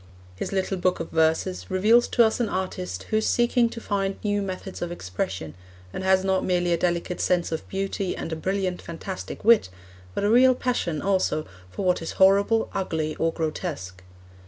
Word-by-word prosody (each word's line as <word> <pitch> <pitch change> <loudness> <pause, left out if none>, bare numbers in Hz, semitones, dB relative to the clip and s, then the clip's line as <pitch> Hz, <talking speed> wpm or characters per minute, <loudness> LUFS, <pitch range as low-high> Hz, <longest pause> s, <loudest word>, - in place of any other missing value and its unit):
His - - -4
little 195 0 -1
Book 180 0 +1
of 165 - -5
Verses 160 +3 +1
reveals 215 +6 +4
to 235 - +4
us 220 - 0
an 235 - 0
artist 185 -1 -3
who 215 - +3
is 220 - +1
seeking 240 0 +3
to 230 - -7
find 195 -3 -1
new 205 -1 +1
methods 190 0 -6
of 175 0 -3
expression 90 - -4 0.4
and 190 - -4
has 190 0 +3
not 190 -1 +1
merely 175 -1 +1
a - - +2
delicate 175 +1 -1
sense 180 -2 +1
of 160 - -4
beauty 195 -1 -2
and 160 - -4
a - - -1
brilliant, 185 +2 -2
fantastic 185 +4 -7
wit, 230 - +5 0.5
but - - -1
a 205 - +3
real 255 +2 +6
passion 210 -12 -1
also 185 -6 +1 0.2
for 190 - -5
what 180 -1 +2
is 165 - -5
horrible, 200 +4 +4
ugly, 160 -5 -2
or 165 0 +1
grotesque. 150 - -4
185 Hz, 185 wpm, -25 LUFS, 165-200 Hz, 0.5 s, real